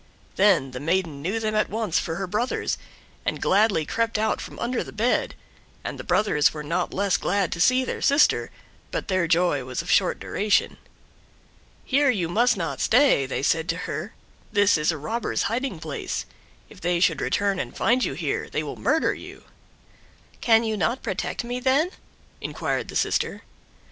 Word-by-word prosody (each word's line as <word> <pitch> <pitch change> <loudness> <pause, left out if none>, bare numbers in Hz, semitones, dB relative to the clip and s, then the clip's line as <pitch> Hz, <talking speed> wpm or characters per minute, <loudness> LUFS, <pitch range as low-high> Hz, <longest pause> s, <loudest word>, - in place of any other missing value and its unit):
Then 185 -9 +3
the 125 - -6
maiden 165 -1 -1
knew 195 +9 -1
them 215 -1 -1
at 215 0 +1
once 215 -5 0
for 165 - -3
her 195 - -3
brothers, 215 +7 -1 0.4
and - - -2
gladly 195 -5 +3
crept 230 +6 0
out 220 +1 0
from - - -9
under 240 +1 -1
the - - -10
bed, 230 +4 0 0.5
and - - -5
the - - -5
brothers 155 -9 +2
were 150 - -5
not 175 +4 -1
less 200 -1 +1
glad 195 -1 0
to 170 - -2
see 255 +5 +4
their - - -4
sister, 280 +2 +3 0.4
but - - -4
their 185 -3 +1
joy 165 -4 +2
was 125 0 -4
of - - -3
short - - +3
duration. 210 0 0 1.1
"Here 280 +1 +3
you 185 -9 0
must 235 +4 +3
not 160 -7 -3
stay," 245 - +4 0.2
said 160 +2 +2
they 165 - 0
to 180 - -6
her; - - -5 0.4
"this 205 -1 +4
is 150 +2 +2
a 160 - -4
robber's 225 +11 -2
hiding 240 -5 -2
place; 155 -2 -4 0.4
if - - -16
they 175 0 +1
should 170 -5 +2
return 200 -2 0
and - - -5
find 245 +2 +2
you - - -1
here, 155 -2 -2
they 155 - -2
will 145 - -6
murder 295 +9 +2
you." - - -11 1.0
"Can 225 -1 +5
you 220 -1 -1
not 235 +5 0
protect - - -3
me, 245 +1 -3
then?" 275 +7 +2 0.5
inquired - - -2
the - - -9
sister. - - 0
200 Hz, 180 wpm, -24 LUFS, 165-230 Hz, 1.1 s, Can